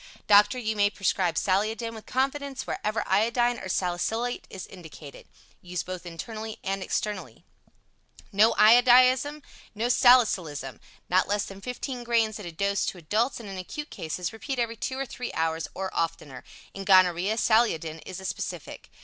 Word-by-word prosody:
Doctor, 205 Hz, +3 st, +5 dB
you 220 Hz, -3 st, -2 dB
may 205 Hz, -1 st, +3 dB
prescribe 185 Hz, -4 st, 0 dB
Saliodin 215 Hz, +4 st, 0 dB
with 220 Hz, -1 st, -11 dB
confidence 275 Hz, +1 st, -2 dB
wherever 215 Hz, +2 st, -2 dB
iodine 235 Hz, +4 st, +2 dB
or 190 Hz, -, -7 dB
salicylate 205 Hz, +8 st, -2 dB
is 190 Hz, -, -7 dB
indicated. 160 Hz, -5 st, -12 dB, 0.3 s
Used 180 Hz, 0 st, -4 dB
both 185 Hz, -1 st, -7 dB
internally 220 Hz, +6 st, -7 dB
and 195 Hz, 0 st, -2 dB
externally. 210 Hz, +2 st, -4 dB, 0.9 s
No 215 Hz, +2 st, +4 dB
Iodism, 255 Hz, +6 st, +5 dB, 0.3 s
no 230 Hz, +3 st, -1 dB
Salicylism. 190 Hz, -, +3 dB, 0.3 s
Not 185 Hz, +1 st, +2 dB
less 205 Hz, 0 st, 0 dB
than 195 Hz, 0 st, -10 dB
15 250 Hz, +1 st, -5 dB
grains 225 Hz, -2 st, +1 dB
at 200 Hz, -, -7 dB
a -, -, -6 dB
dose 200 Hz, +4 st, -1 dB
to -, -, -3 dB
adults, 215 Hz, -, -1 dB
and 225 Hz, -, -9 dB
in 195 Hz, -1 st, -6 dB
acute 295 Hz, -, -7 dB
cases 165 Hz, +3 st, -4 dB
repeat 265 Hz, +4 st, -5 dB
every 230 Hz, -1 st, -1 dB
2 260 Hz, +3 st, -4 dB
or 270 Hz, -, -2 dB
3 250 Hz, -1 st, -6 dB
hours 160 Hz, 0 st, -1 dB
or 190 Hz, 0 st, -4 dB
oftener. 155 Hz, -5 st, -3 dB, 0.3 s
In 195 Hz, -, -6 dB
gonorrhoea, 185 Hz, +1 st, +4 dB
Saliodin 165 Hz, -10 st, +2 dB
is 185 Hz, -1 st, -7 dB
a 190 Hz, -, -9 dB
specific. -, -, -6 dB
210 Hz, 160 wpm, -27 LUFS, 185-240 Hz, 0.9 s, Doctor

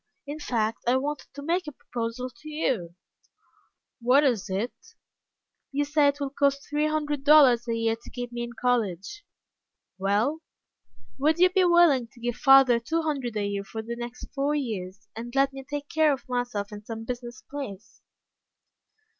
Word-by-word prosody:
In 290 Hz, +2 st, -6 dB
fact, 225 Hz, -6 st, -1 dB
I 250 Hz, +2 st, +4 dB
wanted 290 Hz, +2 st, -3 dB
to 285 Hz, -, -7 dB
make 345 Hz, +3 st, 0 dB
a -, -, -4 dB
proposal 245 Hz, -1 st, -5 dB
to 305 Hz, +5 st, -12 dB
you." 240 Hz, -, -2 dB, 1.1 s
"What 255 Hz, +5 st, +5 dB
is 225 Hz, -8 st, +1 dB
it?" 200 Hz, +6 st, -2 dB, 1.0 s
"You 290 Hz, +1 st, 0 dB
say 295 Hz, 0 st, +3 dB
it 285 Hz, 0 st, +1 dB
will 280 Hz, -1 st, -3 dB
cost 280 Hz, 0 st, +1 dB
three 300 Hz, +1 st, +1 dB
hundred 295 Hz, -2 st, -1 dB
dollars 275 Hz, -5 st, +6 dB
a 230 Hz, -, 0 dB
year 225 Hz, 0 st, +1 dB
to 230 Hz, -, -14 dB
keep 245 Hz, -1 st, -6 dB
me 240 Hz, 0 st, -4 dB
in 240 Hz, 0 st, -5 dB
college?" 235 Hz, -, -1 dB, 0.8 s
"Well?" 210 Hz, +11 st, +1 dB, 0.8 s
"Would 310 Hz, +4 st, +3 dB
you 365 Hz, +1 st, +5 dB
be 375 Hz, -1 st, +4 dB
willing 340 Hz, -8 st, +5 dB
to -, -, -17 dB
give 240 Hz, 0 st, -3 dB
father 270 Hz, -3 st, +6 dB
two 325 Hz, +8 st, -1 dB
hundred 270 Hz, -7 st, -2 dB
a 205 Hz, -, 0 dB
year 200 Hz, 0 st, -2 dB
for 220 Hz, +3 st, -6 dB
the 235 Hz, +1 st, -5 dB
next 240 Hz, +1 st, -7 dB
four 280 Hz, +2 st, 0 dB
years, 205 Hz, -7 st, -4 dB
and 240 Hz, +3 st, -7 dB
let 275 Hz, 0 st, +3 dB
me 270 Hz, 0 st, -8 dB
take 290 Hz, 0 st, -4 dB
care 315 Hz, -1 st, +3 dB
of 270 Hz, -, -4 dB
myself 245 Hz, -5 st, -2 dB
in 210 Hz, 0 st, -8 dB
some 225 Hz, +1 st, -7 dB
business 240 Hz, -1 st, -6 dB
place?" 225 Hz, -9 st, -8 dB
250 Hz, 175 wpm, -26 LUFS, 230-290 Hz, 1.1 s, dollars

